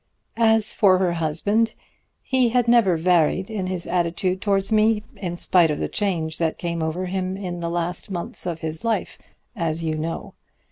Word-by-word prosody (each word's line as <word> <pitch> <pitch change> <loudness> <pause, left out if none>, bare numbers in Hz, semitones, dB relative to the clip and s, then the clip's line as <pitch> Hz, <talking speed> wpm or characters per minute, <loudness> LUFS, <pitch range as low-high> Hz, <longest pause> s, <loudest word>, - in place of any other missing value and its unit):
As 220 -2 +4
for 190 -3 +4
her 180 -2 +1
husband, 185 +8 0 0.5
he 255 -2 +2
had 245 0 +1
never 230 -8 +4
varied 180 +3 +2
in 195 -4 -3
his 185 -2 -3
attitude 180 +2 0
towards 195 0 0
me, 215 0 +3
in 175 -3 -4
spite 175 -2 +3
of 150 - -1
the - - -2
change 170 -6 -2
that 165 -1 0
came 170 -1 -3
over 160 +4 -2
him 185 0 -3
in 180 -3 -5
the 170 0 -3
last 175 +2 -2
months 180 -1 -5
of 165 -2 -4
his 160 +3 -5
life, 230 -1 -2 0.4
as 165 -4 -2
you 160 -1 -1
know. 160 +2 -4
180 Hz, 180 wpm, -23 LUFS, 170-205 Hz, 0.5 s, As